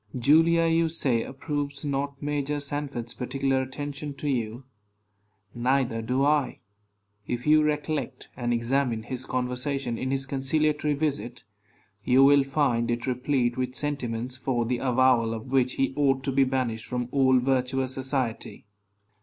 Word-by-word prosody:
Julia, 165 +6 +4
you 165 0 +2
say, 130 -7 +1
approves 145 +2 -4
not 140 0 -2
Major 145 0 -1
Sanford's 140 -5 -4
particular 135 +1 -1
attention 140 +2 -5
to 150 - -5
you. 120 -2 -2 0.9
Neither 125 -1 0
do 125 +4 0
I. 145 -3 +1 0.7
If 120 0 -3
you 155 0 +5
recollect 150 -3 -2
and 120 -2 -2
examine 120 -1 0
his 130 +2 -5
conversation 125 0 -2
in 130 - -2
his 135 0 0
conciliatory 150 +2 0
visit, 135 -5 -2 0.6
you 130 +4 +5
will 140 0 +6
find 135 -4 0
it 120 0 -1
replete 125 -1 0
with 130 0 -2
sentiments 130 -4 -3
for 125 -2 -1
the 120 +1 -1
avowal 125 -3 +3
of 115 +3 -8
which 130 -2 +2
he 135 0 0
ought 135 -2 +2
to 135 - -1
be 135 +1 +3
banished 125 -4 -2
from 125 -1 -2
all 130 -2 +4
virtuous 130 0 0
society. 130 -5 -3
135 Hz, 145 wpm, -26 LUFS, 125-145 Hz, 0.9 s, will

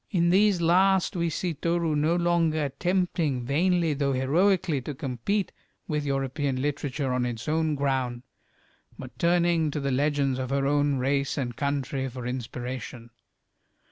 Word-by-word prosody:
In 170 -4 +2
these 195 -1 +4
last 185 +3 +3
we 170 -1 0
see 170 +2 -2
Toru 170 0 0
no 155 +3 +2
longer 170 -3 +1
attempting 160 -2 -1
vainly, 165 +3 +2
though 140 -1 0
heroically, 165 +4 +2
to 145 +3 -6
compete 140 - -2 0.4
with 150 -2 -2
European 135 0 -1
literature 140 -1 -2
on 125 -1 0
its 120 -2 -4
own 155 0 +1
ground, 130 -3 -1 0.7
but 125 -2 -10
turning 170 -2 +2
to 150 - -3
the 140 -1 -1
legends 140 -1 +1
of 130 -1 -3
her 135 0 0
own 145 0 +2
race 140 +2 0
and 120 -4 -3
country 135 0 -2
for 125 -1 -7
inspiration. 125 -1 -6
145 Hz, 145 wpm, -26 LUFS, 130-170 Hz, 0.7 s, these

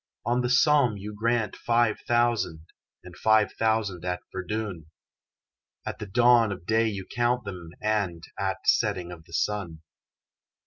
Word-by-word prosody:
On 120 +2 +1
the 125 - -1
Somme 125 -3 +4
you 105 +2 -7
grant 115 +1 0
five 115 -2 +1
thousand 120 -9 +1 0.4
And 90 -1 -12
five 110 +1 +3
thousand 110 -6 0
at 90 0 -2
Verdun; 95 -3 -4 1.0
At - - -5
the 105 - -6
dawn 120 +1 +4
of 90 -3 -7
day 110 +3 +2
you 100 -3 -4
count 120 +3 0
them 90 -4 -7
And 100 -6 -1
at - - -1
setting 90 -1 +1
of 80 -2 -11
the 85 - -17
sun. 85 -3 -2
105 Hz, 145 wpm, -26 LUFS, 90-120 Hz, 1.0 s, Somme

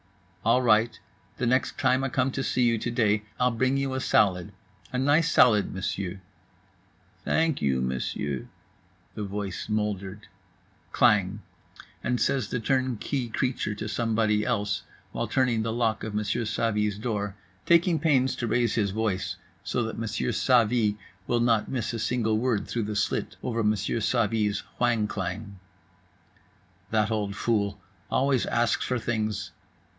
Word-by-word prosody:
"All 120 +3 +3
right, 115 0 +3 0.4
the 130 - -1
next 130 +2 +1
time 130 0 +2
I 135 - 0
come 130 +1 +1
to 135 - -2
see 130 -1 +1
you 115 -2 +3
to 120 - -2
day 110 -3 +2 0.2
I'll 125 0 +3
bring 130 +4 +1
you 135 -1 -1
a 130 - -1
salad, 90 -8 +2 0.4
a 125 - -2
nice 145 +5 +3
salad, 105 -5 +5
Monsieur." 95 0 -3 1.0
"Thank 160 -3 +1
you, 65 -2 +1
Monsieur," 65 +1 -2 0.7
the 105 - -5
voice 100 -1 -4
moldered. 105 -1 -2 0.7
Klang!!—and 105 +4 -1
says 135 -2 +1
the 125 - -1
turnkey 130 0 -1
creature 125 -3 -1
to 105 - -5
somebody 110 -1 +1
else; 100 -3 -1 0.3
while - - -2
turning 125 -4 +1
the 115 +1 -1
lock 115 -1 0
of 110 -1 -4
Monsieur 105 +2 -1
Savy's 105 -2 0
door; 105 -3 -3 0.3
taking 170 -1 +4
pains 135 -4 +2
to 120 - -2
raise 120 0 +1
his 105 -3 +1
voice 100 -2 -1 0.3
so 120 - -1
that 110 0 -4
Monsieur 115 0 -1
Savy 115 -4 +3 0.3
will 120 - +2
not 115 -2 +2
miss 120 -3 -2
a 115 - -3
single 110 -2 +1
word 120 -4 0
through 115 - -2
the 105 0 -3
slit 100 - -1
over 115 -2 -1
Monsieur 105 +1 0
Savy's 110 -2 +1 0.2
whang 120 -3 +2
klang: 100 0 -5 1.3
"That 110 0 +1
old 105 -2 -1
fool! 105 -4 0 0.3
Always 135 -2 +2
asks 120 0 +1
for 125 - -1
things. 110 -3 -2
110 Hz, 150 wpm, -27 LUFS, 105-125 Hz, 1.3 s, salad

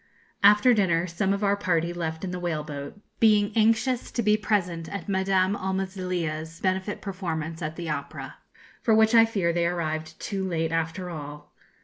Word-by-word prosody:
After 210 +5 +6
dinner, 175 -6 +2
some 185 +3 -1
of 200 +1 -1
our 200 0 +3
party 175 -4 0
left 160 -1 -4
in 185 - -3
the 180 - -4
whale 165 -4 -2
boat, 145 +5 -7 0.2
being 210 -2 +4
anxious 230 +3 +2
to 235 - 0
be 210 0 +4
present 180 -6 -1
at 200 -4 -6
Madame 190 0 +2
Almazilia's 185 -5 -3
benefit 190 +2 -1
performance 165 -5 -4
at 155 0 -4
the 170 -1 -6
opera, 150 - -5 0.4
for 225 - +3
which 220 +1 +4
I 230 -1 +8
fear 195 -7 0
they 170 0 +1
arrived 160 -2 -3
too 195 -3 -3
late 165 -3 -1
after 165 +2 -2
all. 150 -2 -8
185 Hz, 170 wpm, -26 LUFS, 165-200 Hz, 0.4 s, I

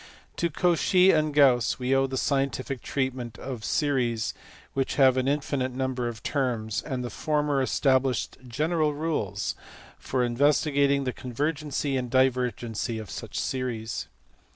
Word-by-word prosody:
To 170 - +1
Cauchy 180 +3 +4
and 155 -1 +2
Gauss 135 -5 +4
we 125 +1 0
owe 135 0 +3
the 130 0 -4
scientific 135 -1 -1
treatment 130 -5 -3
of 125 -5 -6
series 130 -9 0 0.4
which 135 -1 -1
have 130 -2 +5
an 130 0 0
infinite 140 -2 -1
number 130 -1 -2
of 115 -2 -6
terms, 120 -6 -1
and 130 -4 -4
the 120 - -5
former 150 +1 0
established 130 -1 +1
general 150 +4 0
rules 110 - -2 0.5
for 130 -1 -1
investigating 140 +2 +2
the 125 -2 -2
convergency 145 +2 -2
and 125 -1 -3
divergency 125 -3 0
of 110 -4 -7
such - - -5
series. 120 -4 -3
130 Hz, 135 wpm, -27 LUFS, 125-145 Hz, 0.5 s, have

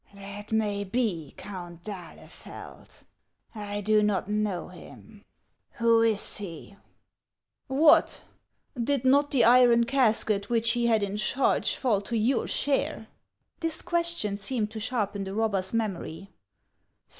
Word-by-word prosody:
"That 200 +2 -9
may 210 -2 0
be, 190 - -2
Count 175 -3 -9
d'Ahlefeld; 185 -6 -11 0.5
I 205 -2 -5
do 215 +1 +3
not 205 -3 0
know 210 -5 -2
him. 200 +4 -14 0.5
Who 230 -1 +3
is 225 -3 +1
he? 200 -1 -8 0.3
" - - -59 0.2
" - - -61
What! 295 +4 +4 0.6
did 275 0 -1
not 285 +2 +4
the 260 -4 +3
iron 240 -1 +6
casket 225 -5 +1
which 230 -1 +3
he 240 0 +1
had 220 -3 +2
in 200 +1 -3
charge 250 +5 +1
fall 225 -7 0
to 230 +3 -3
your 235 +4 +1
share? 270 -5 -1 0.2
" - - -50
This 330 -2 -1
question 340 -12 -1
seemed 210 +1 -2
to 220 - -6
sharpen 210 -4 -2
the 195 +1 -6
robber's 200 -4 0
memory. 195 -4 -4
215 Hz, 135 wpm, -27 LUFS, 200-240 Hz, 0.6 s, iron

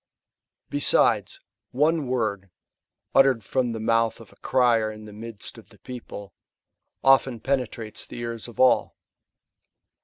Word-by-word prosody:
Besides, - - +2 0.3
one 150 +2 +1
word, 110 -6 -2 0.6
uttered 135 -4 +4
from 125 +3 0
the 115 - -4
mouth 115 +1 +1
of 115 -4 -15
a - - -22
crier 120 -4 +2
in 110 0 -11
the 105 - -11
midst 110 0 -7
of - - -18
the - - -19
people, 115 -6 -9 0.7
often 135 -3 +4
penetrates 120 -4 -3
the - - -9
ears 115 -1 -5
of 120 - -13
all. 130 -1 +3
115 Hz, 130 wpm, -25 LUFS, 110-130 Hz, 0.7 s, uttered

